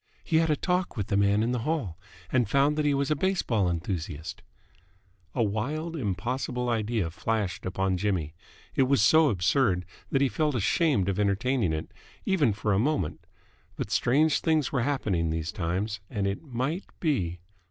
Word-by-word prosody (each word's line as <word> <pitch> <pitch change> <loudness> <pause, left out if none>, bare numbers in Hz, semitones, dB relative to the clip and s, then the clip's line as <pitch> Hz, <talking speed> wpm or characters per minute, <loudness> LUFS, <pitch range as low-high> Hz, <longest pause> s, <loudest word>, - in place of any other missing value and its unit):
He 160 - +1
had 160 0 +3
a 150 - +3
talk 180 -3 -1
with 105 -1 -3
the 100 - +1
man 100 +1 +3
in 120 - 0
the 125 - 0
hall 115 - -2 0.3
and 120 -5 +2
found 140 +4 +3
that 150 -1 0
he 145 - +3
was 140 +1 0
a - - +4
baseball 140 - +1
enthusiast 85 -2 -4 0.5
" 95 -2 -36
A 120 - +2
wild, 145 +11 -2
impossible 125 - -2
idea 110 -6 0
flashed 105 0 -2
upon 95 0 0
Jimmy. 90 -6 -1 0.4
It 130 - +3
was 140 -7 +4
so 155 +6 +6
absurd 90 -1 +2 0.2
that 135 - +1
he - - +4
felt 150 +4 0
ashamed 120 - +2
of 100 0 -1
entertaining 105 +1 +1
it 80 0 -4 0.3
even 160 - +3
for 105 0 -1
a 95 - +2
moment. 130 - -1 0.5
But 105 - -4
strange 140 +6 +3
things 155 -4 +1
were 135 - +1
happening 105 - 0
these 80 0 -2
times, 95 +5 -2
and 100 -1 -2
it 100 0 -2
might 140 +5 -3
be 95 - 0
115 Hz, 175 wpm, -27 LUFS, 95-140 Hz, 0.5 s, so